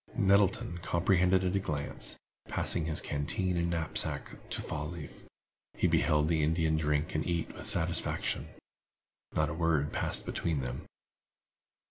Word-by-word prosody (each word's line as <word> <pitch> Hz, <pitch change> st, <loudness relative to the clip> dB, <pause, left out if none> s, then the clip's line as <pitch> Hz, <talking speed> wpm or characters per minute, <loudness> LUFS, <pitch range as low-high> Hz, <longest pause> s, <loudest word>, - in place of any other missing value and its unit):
Nettleton 100 Hz, -1 st, +3 dB
comprehended 90 Hz, +2 st, +3 dB
all 90 Hz, -, +2 dB
at -, -, -1 dB
a -, -, +3 dB
glance. 75 Hz, -6 st, -3 dB, 0.3 s
Passing 80 Hz, -, +1 dB
his 80 Hz, -1 st, -1 dB
canteen 90 Hz, +6 st, -1 dB
and 85 Hz, 0 st, +1 dB
knapsack 85 Hz, -2 st, -3 dB
to -, -, -3 dB
Fall 75 Hz, 0 st, -3 dB
leaf, 85 Hz, -6 st, -8 dB, 0.5 s
he -, -, +1 dB
beheld 75 Hz, 0 st, +3 dB
the 80 Hz, -1 st, +2 dB
Indian 80 Hz, +1 st, +2 dB
drink 75 Hz, 0 st, +1 dB
and 75 Hz, -, 0 dB
eat 85 Hz, -1 st, -1 dB
with -, -, -8 dB
satisfaction. 85 Hz, 0 st, 0 dB, 0.9 s
Not 75 Hz, -1 st, +2 dB
a -, -, -2 dB
word 80 Hz, -3 st, +1 dB
passed -, -, -1 dB
between 80 Hz, -5 st, -1 dB
them. 60 Hz, 0 st, -5 dB
80 Hz, 145 wpm, -32 LUFS, 75-90 Hz, 0.9 s, Nettleton